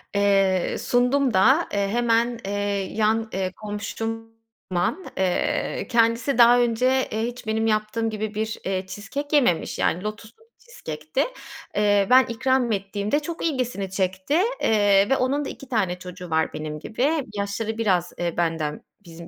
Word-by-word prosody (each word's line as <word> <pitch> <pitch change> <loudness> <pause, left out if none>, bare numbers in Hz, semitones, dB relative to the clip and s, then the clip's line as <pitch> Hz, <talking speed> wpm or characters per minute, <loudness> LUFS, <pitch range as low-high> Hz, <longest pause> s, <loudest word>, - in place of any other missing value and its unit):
Eee, 195 -2 +2
sundum 250 +1 +2
da. 265 - +4
Eee, 200 -1 +1
hemen, 235 +2 +1
eee, 200 -1 -2
yan, 220 +1 +1
eee, 185 -1 -1
komşum 225 +2 -6 0.3
Alman. 180 - -1
Eee, 185 -2 -1
kendisi 230 +3 +2
daha 240 0 +7
önce, 250 +2 +2
eee, 220 +1 -1
hiç 240 -1 -8
benim 220 +1 0
yaptığım 215 +1 0
gibi 215 0 -4
bir, 220 +1 -2
eee, 190 -1 -1
cheesecake 280 +10 -4
yememiş, 240 - +2
yani, 180 - 0
lotuslu 215 - -7
bir 460 - -29
cheesecake'ti. 155 - -4 0.5
Eee, 205 -1 +3
ben 255 +1 +7
ikram 260 0 0
ettiğimde, 200 +5 -1
çok 330 +3 -5
ilgisini 250 - -2
çekti, 190 - 0 0.2
eee, 205 -2 +4
ve 270 - +3
onun 275 +3 0
da - - -4
2 275 - -10
tane 190 -7 0
çocuğu 180 0 -9
var 160 0 0
benim 155 0 -5
gibi. 245 - -1 0.3
Yaşları 210 +2 -3
biraz, 185 -6 +1
eee, 175 -1 -3
benden 160 -3 -1 0.2
bizim 170 0 -11
215 Hz, 155 wpm, -24 LUFS, 190-245 Hz, 0.5 s, daha